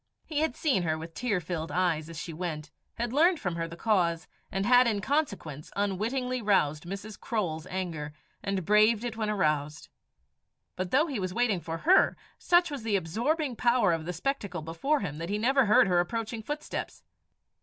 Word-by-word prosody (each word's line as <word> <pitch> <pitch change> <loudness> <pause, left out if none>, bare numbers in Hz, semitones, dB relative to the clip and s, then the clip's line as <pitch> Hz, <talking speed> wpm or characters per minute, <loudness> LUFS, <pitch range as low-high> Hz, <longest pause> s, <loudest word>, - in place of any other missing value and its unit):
He 300 -2 -2
had 315 -5 0
seen 275 - +1
her 160 -2 0
with 165 +1 -8
tear 210 -1 0
filled 165 -1 -4
eyes 170 -3 0
as 165 - -8
she 165 - -6
went, 155 -2 -5 0.2
had 235 +1 -3
learned 335 +4 +4
from 180 -8 -2
her 165 0 -2
the 165 - -9
cause, 175 -5 +1 0.2
and 195 +1 -1
had 245 +1 +6
in 215 -3 +1
consequence 200 - -2
unwittingly 230 +6 -1
roused 165 -8 +2
Mrs. 200 +3 -7
Croale's 170 -8 -2
anger, 170 -5 -4 0.3
and 195 -3 -2
braved 215 +3 +4
it 240 -2 -3
when 220 -1 -2
aroused. 150 -7 -1 0.9
But 185 0 -3
though 285 - +4
he 275 -9 -3
was 185 -1 -3
waiting 225 -7 +1
for 165 0 -4
her, 365 - +4 0.2
such 350 -1 +3
was 285 -3 -4
the 220 -2 0
absorbing 245 - 0
power 235 -6 +3
of 160 -1 -3
the 180 - -2
spectacle 200 - -3
before 165 - 0
him 155 -6 -4
that 165 +2 -4
he 205 - 0
never 265 +4 +3
heard 210 - +6
her 180 -2 +3
approaching 225 +4 -2
footsteps. 295 +6 -5
200 Hz, 185 wpm, -29 LUFS, 165-245 Hz, 0.9 s, had